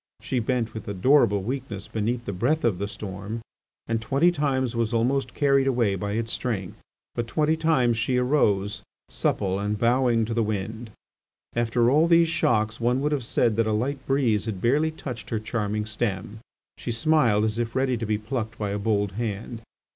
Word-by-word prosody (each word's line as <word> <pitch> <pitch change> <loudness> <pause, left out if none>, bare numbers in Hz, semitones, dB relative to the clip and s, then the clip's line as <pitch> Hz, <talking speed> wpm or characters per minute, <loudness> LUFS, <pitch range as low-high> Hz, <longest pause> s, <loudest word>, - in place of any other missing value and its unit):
She 130 - -2
bent 115 -1 -1
with 110 +1 -7
adorable 105 0 +3
weakness 120 -4 -4
beneath 115 +2 -2
the 100 - -3
breath 125 - 0
of 105 -7 +1
the 100 - -2
storm, 105 +2 -6 0.4
and 115 0 -1
twenty 140 +9 +3
times 130 -6 0
was 115 0 0
almost 130 +4 0
carried 140 -2 +3
away 120 -6 +2
by 100 +2 -3
its 115 +1 -2
strength, 100 -7 -3 0.3
but 120 -1 -3
twenty 155 +4 +1
times 135 -8 +2
she 125 +2 +1
arose, 105 -6 +1 0.3
supple 95 -1 0
and, 105 +1 -1
bowing 120 0 +2
to 115 - -3
the 115 - +1
wind. 110 +2 -3 0.7
After 120 +1 +2
all 155 +4 +4
these 170 -1 +5
shocks 110 -7 +1
one 120 +2 +1
would 150 +1 0
have 145 -4 0
said 115 0 +1
that 115 -1 +2
a 110 - +1
light 135 +5 -1
breeze 120 -7 +2
had 110 -5 -4
barely 145 +9 +2
touched 130 -7 -7
her 110 - -1
charming 105 -1 -2
stem; 110 -1 -3 0.4
she 120 - -3
smiled 120 -5 +3
as 110 +1 -1
if 115 0 -2
ready 130 -1 +1
to 115 -1 -3
be 105 0 +1
plucked 110 +1 -4
by 105 -2 -2
a 100 - -2
bold 100 -1 0
hand. 110 +2 -4
115 Hz, 185 wpm, -25 LUFS, 105-130 Hz, 0.7 s, these